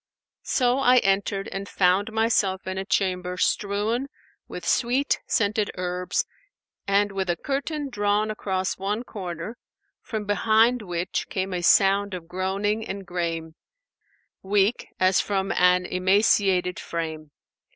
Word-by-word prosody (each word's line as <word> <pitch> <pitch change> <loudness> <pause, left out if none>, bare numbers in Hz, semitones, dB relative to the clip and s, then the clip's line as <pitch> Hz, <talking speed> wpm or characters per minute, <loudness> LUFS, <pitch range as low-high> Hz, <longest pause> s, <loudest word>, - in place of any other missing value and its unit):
So 250 0 +2
I 255 -1 +5
entered 195 -2 +1
and 195 +1 -6
found 190 +3 +2
myself 220 -4 +1
in 190 0 -3
a 190 - -4
chamber 180 -2 -1
strewn 210 +8 0 0.4
with - - -7
sweet 255 +4 +1
scented 210 0 +1
herbs 180 0 -2 0.6
and 200 +1 +2
with 190 -2 -3
a 175 - +2
curtain 285 - -3
drawn 210 -2 0
across 190 -3 -2
one 205 +4 -2
corner, 185 -1 -6 0.4
from 215 -2 -5
behind 220 +4 +3
which 175 -3 -3
came 190 0 -2
a 180 - -2
sound 195 +2 +4
of 170 -2 -8
groaning 195 +4 -1
and 195 0 -5
grame, 165 -2 -3 0.9
weak 200 +3 +1
as 185 +1 +4
from 195 -1 -1
an 180 0 +3
emaciated 185 -1 +2
frame. 160 -2 -5
195 Hz, 130 wpm, -25 LUFS, 180-215 Hz, 0.9 s, I